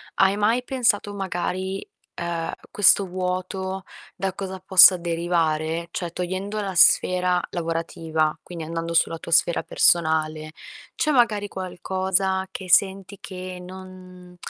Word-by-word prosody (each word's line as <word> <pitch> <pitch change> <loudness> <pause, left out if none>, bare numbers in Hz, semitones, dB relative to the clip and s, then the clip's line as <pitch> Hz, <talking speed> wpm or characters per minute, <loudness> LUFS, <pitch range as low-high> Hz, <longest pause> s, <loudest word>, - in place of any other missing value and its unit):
Hai 195 +1 +3
mai 215 +4 +1
pensato, 230 -6 0
magari, 190 0 -4 0.3
uhm, 170 -1 -3 0.2
questo 200 0 +5
vuoto 185 +1 -4 0.3
da 190 -1 -3
cosa 190 0 -6
possa 185 0 +7
derivare? 165 -1 -1
Cioè, 175 -3 -5
togliendo 190 +4 -4
la 195 -3 -4
sfera 180 0 +4
lavorativa, 165 -2 -2
quindi, 170 -3 -8
andando 165 +1 -4
sulla 165 0 +1
tua - - -9
sfera 170 +1 +3
personale, 155 -2 +1 0.4
c'è 305 - 0
magari 225 -6 +2
qualcosa 190 0 -2
che 185 -1 -8
senti 195 +2 +2
che 185 -1 -8
non 185 -1 -13
185 Hz, 120 wpm, -23 LUFS, 170-190 Hz, 0.4 s, possa